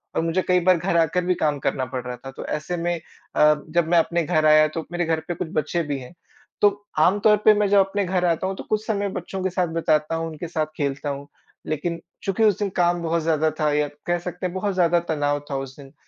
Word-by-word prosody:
और -, -, +2 dB
मुझे 165 Hz, +3 st, 0 dB
कई 180 Hz, 0 st, +4 dB
बार 185 Hz, 0 st, +4 dB
घर 170 Hz, 0 st, 0 dB
आकर 170 Hz, +2 st, +2 dB
भी 180 Hz, -, +3 dB
काम 150 Hz, -2 st, 0 dB
करना 130 Hz, 0 st, -1 dB
पड़ 125 Hz, -1 st, -5 dB
रहा 125 Hz, 0 st, -4 dB
था। 135 Hz, -, -6 dB
तो -, -, -8 dB
ऐसे 155 Hz, +4 st, -3 dB
में 175 Hz, +1 st, -1 dB, 0.4 s
अ, 150 Hz, 0 st, +5 dB
जब 170 Hz, 0 st, +1 dB
मैं 175 Hz, -, +4 dB
अपने 170 Hz, +1 st, +1 dB
घर 155 Hz, -1 st, +1 dB
आया, 155 Hz, 0 st, +6 dB
तो 160 Hz, +1 st, -5 dB
मेरे 175 Hz, -1 st, -1 dB
घर 160 Hz, -1 st, 0 dB
पे 175 Hz, -, -1 dB
कुछ -, -, -4 dB
बच्चे 155 Hz, +3 st, 0 dB
भी 145 Hz, -2 st, -3 dB
हैं, 130 Hz, +7 st, -11 dB, 0.5 s
तो 205 Hz, 0 st, +2 dB
आम 185 Hz, +6 st, +4 dB
तौर 210 Hz, 0 st, +5 dB
पे 215 Hz, -, +8 dB
मैं 205 Hz, -1 st, +2 dB
जब 200 Hz, 0 st, +5 dB
अपने 195 Hz, +1 st, +1 dB
घर 180 Hz, 0 st, 0 dB
आता 170 Hz, +2 st, +1 dB
हूँ, 190 Hz, -, -3 dB
तो -, -, -7 dB
कुछ 215 Hz, 0 st, 0 dB
समय 205 Hz, -2 st, 0 dB
बच्चों 185 Hz, +1 st, -5 dB
के 190 Hz, -, +1 dB
साथ 180 Hz, -1 st, 0 dB
बिताता 155 Hz, -1 st, +1 dB
हूँ, 165 Hz, 0 st, -2 dB
उनके 160 Hz, +2 st, -7 dB
साथ 160 Hz, -2 st, -1 dB
खेलता 140 Hz, 0 st, -2 dB
हूँ। 140 Hz, +1 st, -5 dB, 0.4 s
लेकिन 165 Hz, +2 st, -2 dB, 0.2 s
चूँकि 200 Hz, +3 st, 0 dB
उस 210 Hz, 0 st, +4 dB
दिन 205 Hz, -, 0 dB
काम 175 Hz, 0 st, +2 dB
बहुत 165 Hz, 0 st, 0 dB
ज़्यादा 160 Hz, -1 st, +2 dB
था 150 Hz, -1 st, +2 dB
या 150 Hz, 0 st, +1 dB, 0.2 s
कह 175 Hz, 0 st, +1 dB
सकते 180 Hz, +1 st, -6 dB
हैं 180 Hz, -, -2 dB
बहुत 200 Hz, +1 st, -1 dB
ज़्यादा 175 Hz, -1 st, +3 dB
तनाव 145 Hz, -2 st, 0 dB
था 140 Hz, -, -1 dB
उस 135 Hz, -1 st, -6 dB
दिन। 135 Hz, 0 st, -13 dB
170 Hz, 260 wpm, -23 LUFS, 155-185 Hz, 0.5 s, पे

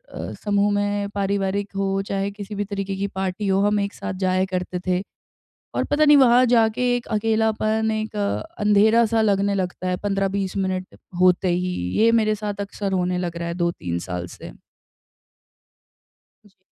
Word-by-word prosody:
अ, -, -, -5 dB
समूह 205 Hz, 0 st, +2 dB
में 205 Hz, 0 st, -1 dB
पारिवारिक 200 Hz, 0 st, -1 dB
हो, 195 Hz, 0 st, 0 dB
चाहे 195 Hz, 0 st, -1 dB
किसी 205 Hz, 0 st, -8 dB
भी 205 Hz, 0 st, -2 dB
तरीके 195 Hz, -1 st, -4 dB
की 200 Hz, +1 st, -1 dB
पार्टी 190 Hz, +1 st, -3 dB
हो, 195 Hz, 0 st, +2 dB
हम 210 Hz, 0 st, +2 dB
एक 200 Hz, 0 st, -2 dB
साथ 200 Hz, 0 st, -5 dB
जाया 185 Hz, 0 st, +2 dB
करते 180 Hz, 0 st, -2 dB
थे। 180 Hz, 0 st, +1 dB, 0.7 s
और -, -, 0 dB
पता 295 Hz, +1 st, +2 dB
नहीं, 295 Hz, -1 st, +7 dB
वहाँ 250 Hz, -2 st, +6 dB
जाके 230 Hz, 0 st, +3 dB
एक 245 Hz, -, -6 dB
अकेलापन 220 Hz, 0 st, +1 dB
एक 215 Hz, 0 st, -3 dB
अ, 205 Hz, -1 st, -1 dB, 0.2 s
अंधेरा-सा 220 Hz, +2 st, +4 dB
लगने 200 Hz, -1 st, +2 dB
लगता 185 Hz, -1 st, -3 dB
है 180 Hz, -, 0 dB
15-20 195 Hz, -1 st, -1 dB
मिनट 185 Hz, -1 st, -3 dB, 0.2 s
होते 185 Hz, 0 st, +4 dB
ही, 180 Hz, +1 st, 0 dB, 0.3 s
ये 225 Hz, +1 st, +6 dB
मेरे 215 Hz, -2 st, +3 dB
साथ 205 Hz, -1 st, -5 dB
अक्सर 200 Hz, 0 st, -4 dB
होने 180 Hz, -1 st, 0 dB
लग 175 Hz, -2 st, -3 dB
रहा 170 Hz, 0 st, -3 dB
है 170 Hz, -, -3 dB
2-3 90 Hz, -, -2 dB
साल 90 Hz, -1 st, -3 dB
से। -, -, -9 dB, 2.0 s
जी। 195 Hz, -, -29 dB
200 Hz, 170 wpm, -22 LUFS, 190-215 Hz, 2.0 s, नहीं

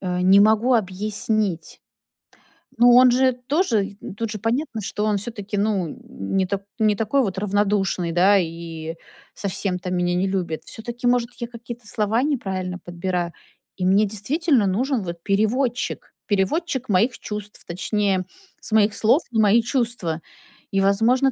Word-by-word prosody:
э, 180 Hz, -1 st, -2 dB
не 195 Hz, +2 st, +6 dB
могу 220 Hz, +4 st, +4 dB
объяснить. 210 Hz, -2 st, -1 dB, 1.0 s
Ну 240 Hz, +1 st, +7 dB
он 250 Hz, 0 st, +7 dB
же 260 Hz, +1 st, +3 dB
тоже 265 Hz, -, +2 dB
и 200 Hz, -2 st, -10 dB
тут 225 Hz, +1 st, -3 dB
же 215 Hz, -, -5 dB
понятно, 235 Hz, +3 st, -1 dB
что 210 Hz, +1 st, -3 dB
он 210 Hz, -1 st, +1 dB
всё-таки, 205 Hz, -1 st, -5 dB
ну, 200 Hz, -4 st, +1 dB
н -, -, -8 dB
н 95 Hz, -, -5 dB
не 190 Hz, -, +3 dB
та 200 Hz, 0 st, -2 dB, 0.2 s
не 215 Hz, -1 st, +3 dB
такой 225 Hz, +6 st, +1 dB
вот 195 Hz, -5 st, -2 dB
равнодушный, 195 Hz, -3 st, 0 dB
да, 190 Hz, +4 st, +5 dB
и 165 Hz, -1 st, -5 dB, 0.4 s
совсем 190 Hz, -1 st, -2 dB
то 180 Hz, 0 st, -5 dB
меня 175 Hz, -1 st, 0 dB
не 185 Hz, +2 st, +1 dB
любит. 175 Hz, -5 st, -2 dB
Всё-таки, 240 Hz, +2 st, -5 dB
может, 245 Hz, -1 st, +2 dB
я 235 Hz, -, -3 dB
какие-то 235 Hz, -1 st, -9 dB
слова 220 Hz, +4 st, 0 dB
неправильно 190 Hz, -10 st, -2 dB
подбираю. 175 Hz, -1 st, -3 dB, 0.4 s
И 185 Hz, -, -2 dB
мне 195 Hz, +3 st, +4 dB
действительно 250 Hz, -, +1 dB
нужен 235 Hz, +5 st, 0 dB
вот 170 Hz, -2 st, -6 dB
переводчик, 230 Hz, +5 st, 0 dB
переводчик 260 Hz, -, 0 dB
моих 215 Hz, +5 st, +2 dB
чувств, 210 Hz, -1 st, -7 dB
точнее, 190 Hz, +1 st, 0 dB, 0.4 s
с -, -, -7 dB
моих 215 Hz, -1 st, +3 dB
слов 245 Hz, +9 st, +3 dB
в 230 Hz, -, -3 dB
мои 220 Hz, +2 st, +5 dB
чувства. 230 Hz, -, -2 dB, 0.5 s
И, 195 Hz, -, +2 dB
возможно, 230 Hz, +7 st, +3 dB
210 Hz, 160 wpm, -22 LUFS, 185-235 Hz, 1.0 s, Ну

